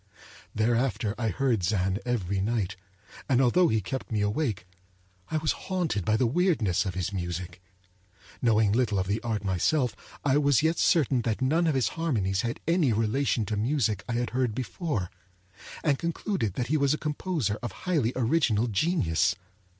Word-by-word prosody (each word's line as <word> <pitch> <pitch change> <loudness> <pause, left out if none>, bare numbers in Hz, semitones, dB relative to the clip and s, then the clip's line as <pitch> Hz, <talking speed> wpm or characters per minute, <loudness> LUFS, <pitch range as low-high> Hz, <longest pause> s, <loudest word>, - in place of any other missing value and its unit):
Thereafter 110 -2 +1
I 115 - 0
heard 115 +4 +1
Zann 95 +1 0
every 100 -5 -1
night, 105 -2 -1 0.5
and 130 -2 +4
although 135 +8 +4
he 110 -5 +1
kept 130 +7 -5
me 105 -2 0
awake, 105 - -1 0.6
I 155 - 0
was 155 0 +1
haunted 170 - -2
by 110 +3 +2
the 125 - +2
weirdness 120 - +1
of 90 - -4
his 95 +2 -2
music. 90 -1 -4 0.8
Knowing 110 -3 +3
little 110 -2 +1
of 95 - 0
the 100 +4 -1
art 110 -3 -2
myself, 115 - +1 0.3
I 140 +1 +4
was 140 -3 +3
yet 160 +1 +1
certain 135 -6 +3
that 115 -2 -1
none 160 +6 +2
of 155 - +1
his 125 -6 +2
harmonies 105 - -1
had 120 0 -3
any 165 -6 +3
relation 115 +2 +1
to 110 - -2
music 110 -2 0
I - - -1
had 120 +1 -1
heard 125 -3 0
before; 125 - -3 0.7
and 145 -4 +2
concluded 170 - -2
that 125 - -1
he 155 +6 +1
was 140 0 +2
a - - -6
composer 150 - -2
of 120 - -4
highly 150 -11 +1
original 120 -3 +2
genius. 95 - +1
120 Hz, 170 wpm, -27 LUFS, 105-145 Hz, 0.8 s, and